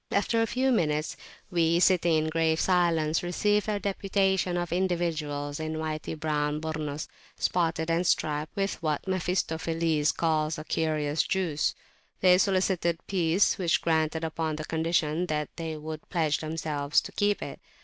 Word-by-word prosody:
After 215 +3 +2
a 225 - +2
few 260 +2 +1
minutes, 155 -8 0 0.4
we, 170 -1 +3
sitting 175 -2 +4
in 155 0 +1
grave 160 0 +1
silence, 165 -4 +2
received 205 +4 +1
a 205 -1 0
deputation 195 -2 0
of 175 -1 -2
individuals 160 -5 -1
in 155 0 -3
whity 155 0 -3
brown 150 -1 0
Burnus, 155 -1 -4 0.3
spotted 165 -2 0
and 170 +2 +1
striped 150 -2 0
with 195 -1 -2
what 155 +2 -1
Mephistopheles 165 -4 0
calls 155 -2 0
a 155 - -6
"curious 155 -1 0
juice." 175 -6 0 0.5
They 180 -1 +6
solicited 185 -3 +1
peace, 180 0 +2
which 170 -3 +2
we - - -22
granted 160 -1 +1
upon 160 -1 -2
the 155 0 -5
condition 160 +1 0
that 150 -2 -2
they 160 -2 -4
would 155 0 -7
pledge 160 -5 +1
themselves 155 -2 0
to - - -9
keep 205 0 0
it. - - -7
165 Hz, 150 wpm, -28 LUFS, 155-180 Hz, 0.5 s, They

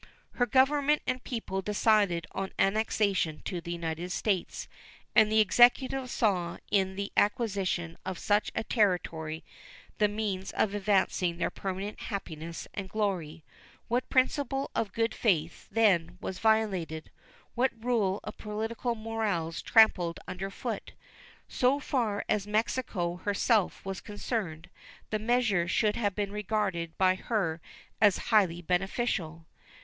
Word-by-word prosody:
Her 245 - 0
Government 285 +4 +3
and 255 0 -2
people 205 -6 -3
decided 205 -3 +2
on 195 0 -4
annexation 195 -5 +1
to 175 -2 -3
the 170 - -6
United 170 +1 -4
States, 190 -2 -1 0.5
and 215 -1 +6
the 220 - +4
Executive 250 +5 +4
saw 185 -9 0
in 190 -2 +2
the 200 +1 -4
acquisition 195 -6 0
of 190 -1 -4
such 205 +3 +1
a 220 - -1
territory 170 -8 0 0.6
the 210 - +5
means 205 -3 -3
of 205 - +1
advancing 190 -4 +1
their - - -1
permanent 195 +2 -5
happiness 165 -4 -6
and 195 -2 -5
glory. 180 -7 -2 0.5
What 245 +2 0
principle 270 +1 +1
of 210 -3 -1
good 225 0 0
faith, 165 -7 0
then, 180 -6 +2
was 190 - -5
violated? 195 -8 0 0.4
What 255 +2 +2 0.2
rule 210 -6 +1
of 210 - -8
political 225 +3 -3
morals 215 -7 -2
trampled 180 -6 +4
under 185 +2 -4
foot? 195 - -5 0.5
So 260 +2 +2
far 230 -8 -1
as 205 -1 0
Mexico 210 -5 -1
herself 205 +2 +1
was 195 -1 -4
concerned, 190 -6 -4 0.4
the 215 - 0
measure 220 -6 +2
should 210 +3 +2
have 205 -4 -1
been 205 -1 -2
regarded 200 -5 -2
by 185 -1 +4
her 185 -5 -2 0.4
as 205 -3 +5 0.2
highly 175 -5 +3
beneficial. 180 -3 -1
200 Hz, 130 wpm, -29 LUFS, 180-220 Hz, 0.6 s, and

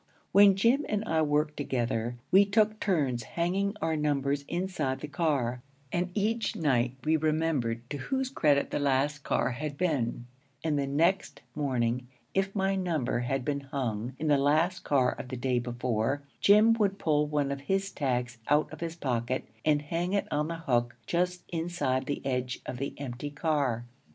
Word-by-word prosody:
When 200 -1 +7
Jim 235 +9 +3
and 210 +1 -1
I 160 -5 +1
worked 150 0 +1
together, 120 -4 -1 0.2
we 195 +2 +8
took 215 +1 +2
turns 140 - +1
hanging 190 - -1
our 160 0 +1
numbers 145 -2 0
inside 170 -7 -2
the - - -5
car; 140 -7 0 0.3
and 175 +1 0
each 225 +3 0
night 130 - +1
we 160 +1 +3
remembered 150 -7 0
to 145 - -2
whose 265 - -2
credit 145 - +2
the - - 0
last 145 +1 +1
car 135 - 0
had 145 +3 -4
been; 135 -9 0 0.4
and 155 -3 +1
the 140 - -1
next 170 +7 +1
morning, 125 -4 -1 0.3
if 195 +1 0
my 195 0 +1
number 165 -11 0
had 125 +1 -1
been 145 -1 0
hung 130 -4 -3
in 155 - -4
the 145 -2 +4
last 160 +6 +2
car 130 -6 +2
of - - -7
the 130 0 -5
day 125 0 +1
before, 120 +2 -1 0.2
Jim 210 +3 +6
would 200 -2 +2
pull 150 -4 +2
one 145 -2 0
of 140 0 -4
his 195 +6 -1
tags 125 -4 -2
out 150 +1 +2
of - - -9
his 165 -1 -4
pocket 130 -4 -1 0.2
and 150 -1 +2
hang 170 +5 -2
it 200 - +1
on 150 +1 0
the 165 - -3
hook 120 -7 0
just 180 +3 0
inside 160 -6 -1
the 145 - -3
edge 125 -1 -1
of 125 - -5
the 140 +2 -4
empty 135 +1 -5
car. 145 -6 0
145 Hz, 175 wpm, -29 LUFS, 130-175 Hz, 0.4 s, we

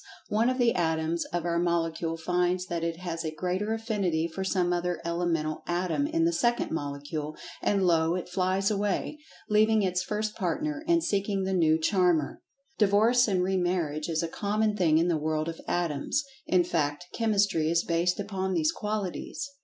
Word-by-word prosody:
one 220 +4 +2
of 255 - -1
the 240 -2 +3
Atoms 160 0 0
of 175 0 -3
our 170 -1 +1
Molecule 165 -1 0
finds 180 +2 0
that 170 -2 -3
it 170 +1 -3
has 170 -2 -4
a 160 - -2
greater 185 +6 -2
Affinity 200 -8 0
for 190 +3 -5
some 180 -2 +1
other 175 0 -1
elemental 170 -2 -1
Atom 180 - 0
in 330 +1 +1
the 340 - +2
second 240 -5 +1
Molecule, 145 +1 -4 0.3
and 195 -2 +2
lo! 165 -1 +3
it 180 - -4
flies 185 +2 0
away, 205 +8 -1 0.3
leaving 215 0 +4
its 180 -1 0
first 210 +2 -2
partner, 300 - -2
and 340 -1 +3
seeking 200 -1 0
the 190 0 -1
new 160 -3 +4
charmer. 175 -3 +1 0.4
Divorce 220 +4 +4
and 185 -3 +1
re 190 +1 +1
marriage 170 -4 -1
is 160 0 0
a - - -1
common 210 +4 0
thing 165 -6 +3
in 165 +2 +3
the 170 -2 +2
world 155 +1 -1
of 165 0 -5
Atoms—in 185 - 0
fact, 155 -1 -1
Chemistry 200 -8 +2
is 170 0 +2
based 170 +2 0
upon 190 -2 -2
these 155 -2 +2
qualities. 210 +5 -4
180 Hz, 175 wpm, -28 LUFS, 165-210 Hz, 0.4 s, leaving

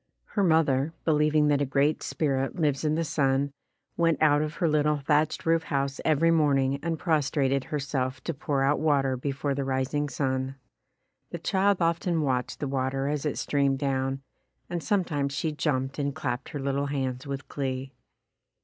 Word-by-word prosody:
Her 200 - +2
mother, 160 -4 +2
believing 150 -1 +3
that 145 -1 +2
a - - +4
Great 140 +2 +1
Spirit 135 -3 -1
lives 150 -5 0
in 155 0 +1
the 165 - 0
sun, 140 -2 +1 0.4
went 165 -2 +2
out 150 -1 +4
of 155 +1 -3
her 170 - +1
little 150 -1 +2
thatched 150 +2 +1
roof 165 0 +2
house 140 -1 -1
every 160 +1 +3
morning 140 -4 +2
and 165 -1 -2
prostrated 140 -4 +1
herself 135 -3 -2
to 165 - -2
pour 140 -1 -1
out 140 +2 +2
water 140 -4 +2
before 140 +2 -2
the 140 0 -2
rising 135 +2 -1
sun. 130 0 -2 0.7
The - - -5
child 195 -1 +1
often 165 0 +1
watched 130 -3 -1
the 145 - -1
water 135 +1 -1
as 150 0 -1
it 145 - -2
streamed 140 -2 +1
down, 135 -1 -1 0.5
and 175 -1 -2
sometimes 155 -10 0
she 160 0 -1
jumped 140 -2 -1
and 140 -1 -1
clapped 125 -1 -3
her 145 - -5
little 140 +1 -1
hands 130 -2 -3
with 140 0 -5
glee. 135 -1 -4
140 Hz, 170 wpm, -27 LUFS, 135-155 Hz, 0.7 s, a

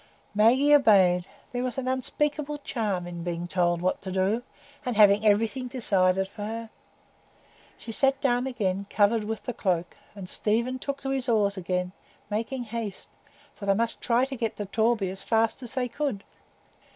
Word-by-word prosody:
Maggie 250 +8 +5
obeyed; 190 -10 +5 0.2
there 245 - -2
was 255 0 -2
an 260 -1 -2
unspeakable 295 +3 -1
charm 205 -7 -2
in 175 -1 -6
being 175 0 -3
told 175 -1 +1
what 185 - 0
to 190 - -6
do, 190 +5 +1 0.4
and 250 -2 -2
having 205 0 +6
everything 220 +4 +2
decided 190 -7 +2
for 205 - -11
her. 225 +1 -5 1.1
She 230 - -8
sat 270 +4 +2
down 250 -1 +1
again 200 -6 -2
covered 210 +1 +2
with 220 0 -4
the 245 - -4
cloak, 175 -5 -1 0.2
and 195 -3 -8
Stephen 235 +7 0
took 280 +1 -4
to 270 - -3
his 265 -2 -1
oars 205 -3 +2
again, 180 -1 -2 0.4
making 230 +4 -2
haste; 225 -3 -6 0.4
for 200 - -8
they 195 - +4
must 230 +2 -1
try 240 +2 +2
to 270 0 -6
get 225 -3 -2
to 205 - -4
Torby 220 -1 +1
as 190 0 -5
fast 225 +4 +1
as 240 -3 -8
they 255 -1 0
could. 245 -5 -3
220 Hz, 175 wpm, -27 LUFS, 195-250 Hz, 1.1 s, having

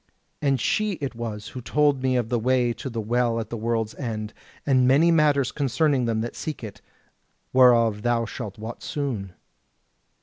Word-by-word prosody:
And 140 -3 +2
she 215 - 0
it 140 -7 -4
was 115 -2 -6
who 125 - -7
told 145 +1 +2
me 130 -1 +1
of 120 -3 0
the 120 -1 +1
way 125 0 +2
to 135 - -6
the 115 -2 -4
Well 115 +1 0
at 110 -1 -6
the - - -2
World's 115 -1 -1
End, 110 -5 -5 0.3
and 130 -3 +3
many 150 +6 +5
matters 145 -5 +3
concerning 140 -1 +1
them 115 -1 0
that 120 - -5
seek 155 -5 -5
it, 110 -1 -8 0.7
whereof 115 -4 +5
thou 120 0 +1
shalt 105 -3 -7
wot 110 +2 -7
soon." 115 -11 -4
120 Hz, 175 wpm, -24 LUFS, 115-135 Hz, 0.7 s, many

